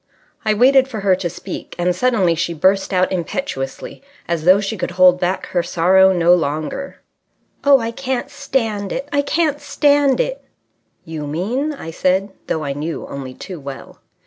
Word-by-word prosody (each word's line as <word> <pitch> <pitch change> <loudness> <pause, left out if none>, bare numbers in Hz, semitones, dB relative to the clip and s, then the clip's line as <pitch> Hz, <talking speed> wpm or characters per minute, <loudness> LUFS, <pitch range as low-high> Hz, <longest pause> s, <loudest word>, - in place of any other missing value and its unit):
I 215 -1 +1
waited 260 +3 +5
for 225 -6 -6
her 195 -2 +3
to 175 -2 -3
speak, 185 +3 -8
and 175 0 +1
suddenly 200 -5 +2
she 170 +1 -2
burst 190 +4 +2
out 185 -1 +2
impetuously 170 - -4 0.3
as 170 -2 -2
though 185 +2 +6
she 205 +2 -3
could 185 - -3
hold 180 -1 +6
back 180 +2 -1
her 175 - +1
sorrow 190 +3 +4
no 175 -1 +4
longer. 160 - -2 0.6
"Oh, 280 -1 +6
I 230 -1 -3
can't 260 0 -3
stand 225 -8 -2
it! 275 - -4
I 285 - +3
can't 295 0 0
stand 285 -2 +2
it!" - - -2 0.6
"You 155 -2 -6
mean...?" 225 - -2
I 220 - -7
said, 190 +4 0 0.2
though 160 - -2
I 140 -1 -2
knew 155 +3 -4
only 130 -2 -7
too 185 -4 -8
well. 140 -1 -9
190 Hz, 170 wpm, -19 LUFS, 170-255 Hz, 0.6 s, though